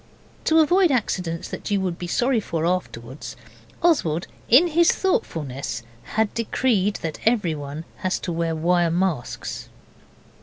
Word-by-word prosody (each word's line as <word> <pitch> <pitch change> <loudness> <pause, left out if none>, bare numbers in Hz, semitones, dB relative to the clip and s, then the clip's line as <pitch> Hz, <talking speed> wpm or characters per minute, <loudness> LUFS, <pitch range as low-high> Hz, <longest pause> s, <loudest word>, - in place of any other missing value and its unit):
To 320 0 +5
avoid 355 +3 +4
accidents 180 - -1
that - - -6
you 200 -1 +2
would 180 -2 -2
be 175 - -4
sorry 245 +6 +2
for 165 -6 -2
afterwards, 140 -7 -3 0.5
Oswald, 175 - +2 0.2
in 295 +9 +7
his 340 +2 +4
thoughtfulness, 135 - -2 0.3
had 220 -1 +2
decreed 220 -3 +1
that 160 -2 -4
everyone 160 -9 0 0.2
was 185 0 +1
to 175 - -3
wear 165 -1 -1
wire 175 +1 +2
masks. 170 -6 -2
180 Hz, 130 wpm, -23 LUFS, 160-240 Hz, 0.5 s, in